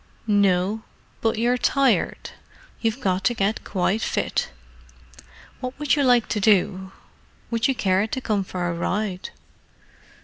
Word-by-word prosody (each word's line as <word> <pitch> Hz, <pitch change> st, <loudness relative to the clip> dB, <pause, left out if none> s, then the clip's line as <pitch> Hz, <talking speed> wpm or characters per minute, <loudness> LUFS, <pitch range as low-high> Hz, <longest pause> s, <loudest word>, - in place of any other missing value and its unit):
"No—but 205 Hz, +2 st, 0 dB
you're 245 Hz, +2 st, +1 dB
tired. 270 Hz, +3 st, +1 dB, 0.5 s
You've 225 Hz, +2 st, 0 dB
got 190 Hz, -6 st, 0 dB
to 240 Hz, -, +2 dB
get 205 Hz, +1 st, 0 dB
quite 195 Hz, +3 st, 0 dB
fit. -, -, -1 dB, 1.1 s
What 255 Hz, 0 st, -5 dB
would 295 Hz, -1 st, +2 dB
you 290 Hz, -, +1 dB
like 245 Hz, -4 st, +4 dB
to 210 Hz, -, 0 dB
do? 190 Hz, -2 st, +2 dB, 0.6 s
Would 230 Hz, -1 st, +1 dB
you 270 Hz, -, +1 dB
care 195 Hz, -2 st, +1 dB
to 260 Hz, -, -3 dB
come 210 Hz, -5 st, 0 dB
for 180 Hz, -1 st, -3 dB
a 170 Hz, -, -1 dB
ride?" 185 Hz, +2 st, -2 dB
215 Hz, 135 wpm, -23 LUFS, 190-240 Hz, 1.1 s, like